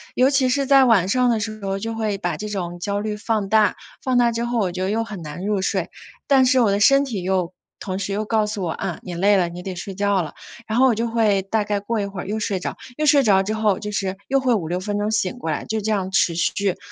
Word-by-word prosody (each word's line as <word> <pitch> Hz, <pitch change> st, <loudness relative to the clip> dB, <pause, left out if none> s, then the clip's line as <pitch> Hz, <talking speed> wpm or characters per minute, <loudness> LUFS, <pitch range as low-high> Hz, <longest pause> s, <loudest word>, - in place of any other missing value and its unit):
尤 260 Hz, +3 st, +4 dB
其 265 Hz, -2 st, +2 dB
是 275 Hz, +2 st, +1 dB
在 270 Hz, 0 st, +6 dB
晚 210 Hz, -7 st, +4 dB
上 250 Hz, +4 st, +2 dB
的 230 Hz, -, +1 dB
时 215 Hz, -1 st, -5 dB
候 195 Hz, 0 st, -2 dB
就 225 Hz, +3 st, -4 dB
会 215 Hz, -3 st, -2 dB
把 195 Hz, -, -3 dB
这 210 Hz, 0 st, -5 dB
种 175 Hz, -4 st, -4 dB
焦 200 Hz, +2 st, -2 dB
虑 210 Hz, 0 st, -3 dB
放 210 Hz, -1 st, -1 dB
大， 215 Hz, -1 st, +3 dB, 0.3 s
放 255 Hz, -1 st, +1 dB
大 240 Hz, -1 st, +4 dB
之 235 Hz, +1 st, -2 dB
后 240 Hz, 0 st, -1 dB
我 195 Hz, -5 st, +1 dB
觉 180 Hz, +1 st, -5 dB
得 190 Hz, -, -1 dB
又 225 Hz, +2 st, 0 dB
很 210 Hz, -5 st, -8 dB
难 160 Hz, +4 st, -7 dB
入 205 Hz, -2 st, 0 dB
睡， -, -, -1 dB, 0.3 s
但 270 Hz, -2 st, +4 dB
是 260 Hz, -1 st, +4 dB
我 220 Hz, -4 st, +3 dB
的 200 Hz, -, +1 dB
身 275 Hz, +6 st, +5 dB
体 225 Hz, -8 st, -4 dB
又 185 Hz, -1 st, -1 dB, 0.3 s
同 190 Hz, -1 st, -4 dB
时 200 Hz, 0 st, -3 dB
又 210 Hz, +2 st, -1 dB
告 215 Hz, 0 st, +1 dB
诉 210 Hz, -2 st, -4 dB
我： 170 Hz, -, -1 dB
“啊， 175 Hz, 0 st, -4 dB
你 180 Hz, -, -6 dB
累 200 Hz, +4 st, +3 dB
了， 180 Hz, -3 st, +2 dB
你 175 Hz, +1 st, -8 dB
得 185 Hz, 0 st, -6 dB
睡 185 Hz, +2 st, -6 dB
觉 200 Hz, -1 st, +1 dB
了。” 155 Hz, -4 st, -6 dB, 0.3 s
然 220 Hz, +2 st, 0 dB
后 265 Hz, -, +6 dB
我 240 Hz, -, +2 dB
就 230 Hz, +2 st, -1 dB
会 215 Hz, -4 st, +2 dB
大 205 Hz, +2 st, -1 dB
概 205 Hz, -1 st, -1 dB
过 225 Hz, +2 st, -2 dB
一 200 Hz, -, -1 dB
会 195 Hz, -2 st, -6 dB
儿 -, -, -8 dB
又 215 Hz, +2 st, -2 dB
睡 205 Hz, -2 st, -1 dB
着， 180 Hz, -, -5 dB, 0.2 s
又 305 Hz, -, 0 dB
睡 290 Hz, -2 st, +5 dB
着 195 Hz, -4 st, +4 dB
之 215 Hz, -, -2 dB
后 215 Hz, -3 st, +1 dB
就 210 Hz, -, -5 dB
是 195 Hz, -2 st, -2 dB
又 275 Hz, +1 st, +3 dB
会 260 Hz, -2 st, +2 dB
5-6 180 Hz, -4 st, -1 dB
分 205 Hz, +2 st, -3 dB
钟 210 Hz, +1 st, -1 dB
醒 220 Hz, +1 st, -1 dB
过 165 Hz, -10 st, -3 dB
来， 150 Hz, -, -3 dB
就 220 Hz, 0 st, -2 dB
这 220 Hz, +2 st, -1 dB
样 190 Hz, -3 st, -1 dB
持 185 Hz, -2 st, +2 dB
续， 190 Hz, +3 st, 0 dB
205 Hz, 300 characters per minute, -22 LUFS, 190-225 Hz, 0.3 s, 在